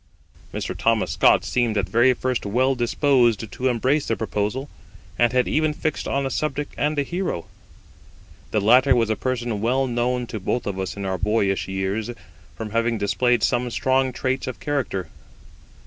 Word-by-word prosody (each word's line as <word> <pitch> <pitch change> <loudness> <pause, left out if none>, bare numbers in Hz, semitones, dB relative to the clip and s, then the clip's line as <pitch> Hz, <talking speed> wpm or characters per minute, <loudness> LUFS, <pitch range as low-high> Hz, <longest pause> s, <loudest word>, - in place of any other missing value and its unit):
Mr. - - -4
Thomas - - +1
Scott - - +4
seemed 120 -3 0
at 95 -3 0
first 125 +4 +2
very 100 - -5
well 130 +4 +3
disposed 120 -3 +2
to 130 - -2
embrace 130 +4 +1
the 115 - 0
proposal, 110 +5 -2 0.5
and 120 -1 +4
had 125 0 +2
even 155 -1 +1
fixed 155 0 -2
on 140 0 0
a 135 - -2
subject 145 +1 -2
and 150 +1 0
a 145 - +2
hero. 175 - -3 1.0
The 110 - 0
latter 125 +5 +5
was 115 -2 +2
a - - +1
person 120 -4 -2
well 130 +4 +2
known 125 0 -1
to 110 -2 -6
both 110 +5 -2
of 100 -2 -3
us 95 +1 -4
in 100 - -4
our 95 -1 -2
boyish 100 -2 +1
years, 95 +4 -2 0.5
from 110 -2 -5
having 115 +1 +1
displayed 115 +3 +1
some 125 0 +1
strong 130 +2 +1
traits 130 +1 -2
of 130 - -5
character. 130 - -2
120 Hz, 175 wpm, -23 LUFS, 110-130 Hz, 1.0 s, latter